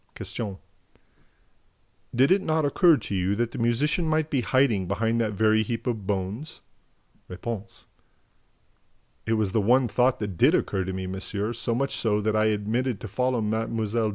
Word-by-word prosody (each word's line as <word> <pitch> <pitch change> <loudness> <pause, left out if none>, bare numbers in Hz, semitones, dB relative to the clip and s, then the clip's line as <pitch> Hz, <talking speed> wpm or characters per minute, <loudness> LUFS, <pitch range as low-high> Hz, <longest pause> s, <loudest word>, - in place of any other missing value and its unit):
Q. 100 -4 -5 1.6
"Did 130 +6 +4
it 195 +1 +4
not 160 -3 0
occur 165 +2 +5
to - - -6
you 95 +1 0
that 120 +1 -1
the - - -6
musician 145 +9 +1
might 155 0 0
be 135 -4 +1
hiding 130 -8 +2
behind 115 +4 0
that 110 -2 -1
very 110 +1 +3
heap 115 +1 -3
of 110 -6 -3
bones?" 105 +10 -3 0.7
R. 90 - -7 1.9
"It 115 - +2
was 110 -3 0
the 110 - +2
one 125 +5 +3
thought 125 +3 +2
that 100 -5 -5
did - - +5
occur 95 -1 -1
to 95 - -3
me, 95 0 -4
monsieur, 100 +4 -3
so 115 0 -2
much 135 +3 -1
so 105 -2 +1
that 105 +1 0
I 110 0 +3
omitted 110 +3 -1
to - - -5
follow 125 +3 0
Mlle. 110 0 -1
115 Hz, 170 wpm, -26 LUFS, 105-130 Hz, 1.9 s, occur